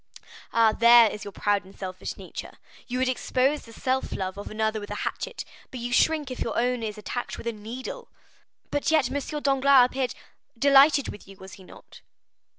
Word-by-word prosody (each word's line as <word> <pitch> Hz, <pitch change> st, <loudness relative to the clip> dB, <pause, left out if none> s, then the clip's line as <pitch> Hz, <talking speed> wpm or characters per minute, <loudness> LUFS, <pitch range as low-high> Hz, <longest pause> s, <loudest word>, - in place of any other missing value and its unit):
"Ah! 225 Hz, -1 st, +4 dB
there 235 Hz, -1 st, +7 dB
is 210 Hz, -, -7 dB
your 200 Hz, -, -7 dB
proud 205 Hz, +1 st, 0 dB
and 190 Hz, +1 st, -17 dB
selfish 185 Hz, -1 st, -6 dB
nature. -, -, -8 dB, 0.3 s
You 250 Hz, -, -3 dB
would 260 Hz, 0 st, +1 dB
expose 260 Hz, +3 st, 0 dB
the 230 Hz, -, -13 dB
self 260 Hz, +3 st, -2 dB
love 190 Hz, -1 st, -3 dB
of 205 Hz, -, -7 dB
another 220 Hz, 0 st, -1 dB
with 205 Hz, -, -9 dB
a -, -, -4 dB
hatchet, -, -, -4 dB, 0.2 s
but 255 Hz, -, -8 dB
you 245 Hz, +1 st, -4 dB
shrink 300 Hz, -1 st, +2 dB
if 255 Hz, -, -6 dB
your 230 Hz, -, -2 dB
own 245 Hz, 0 st, +1 dB
is 215 Hz, -1 st, -4 dB
attacked 240 Hz, +3 st, -5 dB
with -, -, -9 dB
a 235 Hz, -, 0 dB
needle." 245 Hz, -, -7 dB, 0.6 s
"But 290 Hz, -, 0 dB
yet, 310 Hz, -6 st, +2 dB
M. 290 Hz, +1 st, -3 dB
Danglars 275 Hz, -2 st, +5 dB
appeared——" 255 Hz, 0 st, -2 dB, 0.4 s
"Delighted 280 Hz, +2 st, +5 dB
with 205 Hz, -, -10 dB
you, 195 Hz, 0 st, -13 dB
was 190 Hz, -1 st, -12 dB
he 190 Hz, -, -13 dB
not? -, -, -15 dB
245 Hz, 195 wpm, -26 LUFS, 215-270 Hz, 0.6 s, there